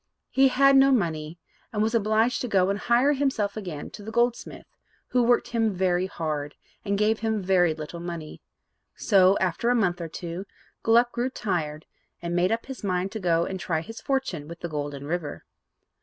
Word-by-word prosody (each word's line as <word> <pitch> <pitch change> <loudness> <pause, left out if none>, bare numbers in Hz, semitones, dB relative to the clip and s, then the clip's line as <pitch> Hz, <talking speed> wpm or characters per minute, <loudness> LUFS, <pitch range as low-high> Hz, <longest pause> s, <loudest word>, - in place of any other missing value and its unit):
He 270 0 +5
had 275 +1 +5
no 270 0 +6
money, 165 - -1 0.3
and 210 -1 0
was 225 +1 0
obliged 220 +2 +2
to 250 - -2
go 195 -3 +2
and 200 - -2
hire 245 +6 +3
himself 260 -8 0
again 180 -9 -6
to - - -10
the 210 - -7
goldsmith, 240 +1 -1 0.4
who 250 - +2
worked 240 0 +2
him 225 -1 +1
very 180 0 +1
hard, 150 -5 -4 0.3
and 200 -1 -1
gave 215 +1 +2
him 220 -1 0
very 180 -3 +3
little 155 +2 -7
money. 170 -3 -7 0.5
So, 195 -2 +4
after 185 +5 0
a 245 - +3
month 180 -6 +1
or 165 - -3
two, 175 +3 -6 0.4
Gluck 235 +2 +4
grew 245 +2 -1
tired, 160 - -3 0.3
and 170 0 -3
made 180 +1 +2
up 225 +1 -1
his 265 -3 -8
mind 185 -1 -1
to 220 - -5
go 170 -3 +2
and 190 -1 -5
try 160 -3 -1
his 225 +7 -9
fortune 260 - -2
with 170 +1 -10
the 170 - -4
Golden 145 -2 -4
River. 160 -1 -4
195 Hz, 190 wpm, -26 LUFS, 170-230 Hz, 0.5 s, no